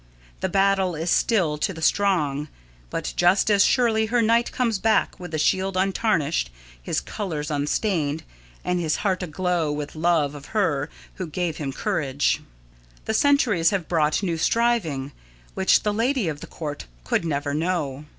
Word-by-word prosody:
The - - -1
battle 195 -2 +2
is 165 +2 -2
still 170 -10 +2
to 195 - 0
the - - -8
strong, 155 -8 +1 0.4
but - - -4
just 185 +4 +3
as 200 -1 +5
surely 225 -4 +2
her 240 +2 +1
knight 230 +2 +2
comes 230 -5 0
back 220 +2 +1
with 175 -2 -8
his 155 -2 0
shield 190 0 +1
untarnished, 185 - +1 0.3
his - - -1
colours 155 -7 -4
unstained, 150 +1 -1 0.4
and 180 0 0
his 160 -3 0
heart 190 -2 +1
aglow 175 -2 -1
with 150 0 -5
love 155 -3 +1
of 145 -1 -10
her 145 -8 +1 0.3
who 185 - -4
gave 165 0 -2
him 140 -3 -3
courage. 140 +1 0 0.6
The 220 - -1
centuries 220 - +3
have 190 -5 -2
brought 155 +2 +1
new 170 -4 -1
striving, 170 - +1 0.4
which 190 - +3
the 210 - 0
Lady 235 -1 +1
of 150 -2 -3
the - - -9
Court 150 - -6 0.2
could 65 - 0
never 145 -3 -2
know. 150 -3 -2
175 Hz, 160 wpm, -24 LUFS, 150-200 Hz, 0.6 s, as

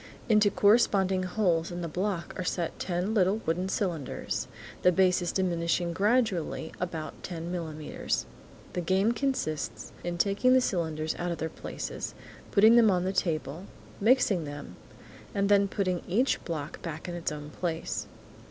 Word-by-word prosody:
Into 210 -3 +5
corresponding 200 -3 +4
holes 180 -3 +1
in 175 0 -5
the - - -2
block 180 +2 -2
are 185 - -3
set 175 -2 -2
ten 180 +4 -1
little 195 -1 +3
wooden 180 +4 0
cylinders, 170 - -2 0.3
the 180 - +5
bases 180 -1 +3
diminishing 170 -2 0
gradually 200 -6 +1
about 165 -3 -4
ten 170 -1 -5
millimetres. 160 -4 -3 0.5
The 180 - -1
game 190 +5 +2
consists 240 - -2
in 175 0 -3
taking 200 +8 +3
the 260 - +7
cylinders 160 -8 -1
out 175 0 -1
of 170 - -3
their 160 - -2
places, - - -6 0.3
putting 220 +3 +6
them 230 -2 +7
on 180 -2 +2
the 190 +1 -1
table, 165 -1 -1 0.3
mixing 215 -5 +4
them, 145 -11 -7 0.6
and 200 0 +1
then 200 -1 +5
putting 185 -3 -1
each 235 +9 +2
one 155 -4 -3
back 160 0 -6
in 175 - -4
its 170 -2 -2
own 150 0 -7
place. 165 -1 -3
180 Hz, 150 wpm, -29 LUFS, 165-200 Hz, 0.6 s, the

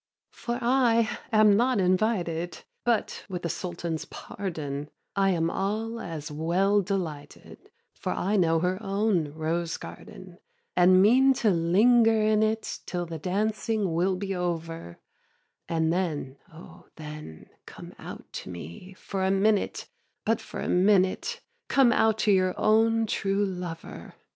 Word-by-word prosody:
4. 235 0 -4
For 250 - -8
I 235 -2 +2
am 215 -2 +6
not 245 +1 +2
invited, 180 -3 0 0.2
But, 235 -3 0
with 180 -2 -5
the 170 - -1
Sultan's 170 -2 -4
pardon, 150 -7 -6 0.3
I 195 -1 +3
am 165 -2 +1
all 220 +4 -2
as 155 -7 -6
well 180 +7 +2
delighted, 175 -7 -6 0.2
For - - -4
I 200 +4 0
know 165 -4 +3
her 185 +3 -1
own 195 -6 0
rose 165 +2 -2
garden, - - -11 0.4
And 185 +1 +6
mean 260 +5 +5
to 220 -4 +2
linger 220 +7 +4
in 215 0 +3
it 220 +1 -1
Till 175 -1 -2
the 165 -1 -6
dancing 205 +1 -1
will 180 +3 +1
be 195 +1 -3
over; 165 - -4 0.7
And 160 0 +1
then, 155 -7 -2
oh 170 +1 -14
then, 150 - -10 0.2
come - - -11
out - - -9
to - - -6
me 85 - -9
For 190 0 -4
a 190 - +2
minute, 200 +2 +1 0.4
but 225 0 +1
for - - -7
a - - -3
minute, 195 - +2 0.3
Come 265 -3 +4
out 220 -2 +3
to 210 - +4
your 185 -1 +2
own 225 +1 +3
true 200 -1 0
lover. 180 -3 -7
190 Hz, 145 wpm, -27 LUFS, 165-215 Hz, 0.7 s, am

